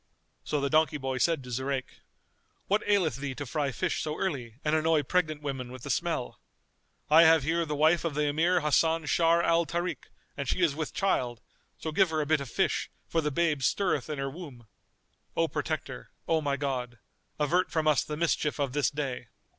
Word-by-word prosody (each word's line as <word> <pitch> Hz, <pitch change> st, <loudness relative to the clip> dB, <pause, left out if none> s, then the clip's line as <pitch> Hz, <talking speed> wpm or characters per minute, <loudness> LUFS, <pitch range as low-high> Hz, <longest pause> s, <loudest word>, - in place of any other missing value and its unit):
So 150 Hz, -, -1 dB
the 140 Hz, -, 0 dB
donkey 155 Hz, -1 st, +3 dB
boy 130 Hz, -2 st, -3 dB
said 165 Hz, -3 st, +1 dB
to 125 Hz, -, -9 dB
Zurayk, 130 Hz, +2 st, -3 dB, 0.7 s
"What 205 Hz, +2 st, +1 dB
aileth 180 Hz, -, +2 dB
thee 140 Hz, -1 st, -4 dB
to 145 Hz, -, -5 dB
fry 140 Hz, +1 st, -1 dB
fish 115 Hz, -, -1 dB
so 155 Hz, 0 st, -3 dB
early 130 Hz, -, -3 dB
and 150 Hz, +1 st, +2 dB
annoy 160 Hz, -1 st, +2 dB
pregnant 155 Hz, -1 st, 0 dB
women 130 Hz, -3 st, -4 dB
with 130 Hz, -1 st, -10 dB
the -, -, -3 dB
smell? -, -, -2 dB, 0.7 s
I 160 Hz, +2 st, +9 dB
have 160 Hz, -2 st, +6 dB
here 165 Hz, +3 st, 0 dB
the 150 Hz, -, -2 dB
wife 155 Hz, +3 st, +3 dB
of 165 Hz, -4 st, -2 dB
the 150 Hz, -, +1 dB
Emir 165 Hz, +5 st, +2 dB
Hasan 160 Hz, +2 st, +2 dB
Sharr 165 Hz, +3 st, +3 dB
al 170 Hz, 0 st, +2 dB
Tarik, 175 Hz, +1 st, -3 dB, 0.3 s
and 140 Hz, -2 st, -4 dB
she 185 Hz, -, +1 dB
is 160 Hz, -5 st, +3 dB
with 150 Hz, -2 st, -5 dB
child; 125 Hz, -, 0 dB, 0.4 s
so 160 Hz, -, -4 dB
give 190 Hz, +3 st, +3 dB
her 160 Hz, -1 st, -1 dB
a 150 Hz, -, 0 dB
bit 155 Hz, 0 st, +2 dB
of 135 Hz, -, -6 dB
fish, -, -, 0 dB, 0.2 s
for 165 Hz, -, 0 dB
the 150 Hz, -, 0 dB
babe 150 Hz, -1 st, 0 dB
stirreth 170 Hz, -2 st, 0 dB
in 150 Hz, -, -3 dB
her 135 Hz, 0 st, -2 dB
womb. 135 Hz, -6 st, -9 dB, 0.7 s
O -, -, +3 dB
Protector, -, -, -4 dB, 0.2 s
O 160 Hz, -1 st, +2 dB
my 140 Hz, -2 st, -1 dB
God, 125 Hz, -4 st, -3 dB, 0.4 s
avert 175 Hz, +5 st, +2 dB
from 160 Hz, -1 st, 0 dB
us 150 Hz, -2 st, +4 dB
the 150 Hz, -, -5 dB
mischief 155 Hz, -2 st, 0 dB
of 140 Hz, -3 st, -1 dB
this 145 Hz, -1 st, +2 dB
day!" 135 Hz, -5 st, -4 dB
150 Hz, 200 wpm, -29 LUFS, 140-165 Hz, 0.7 s, I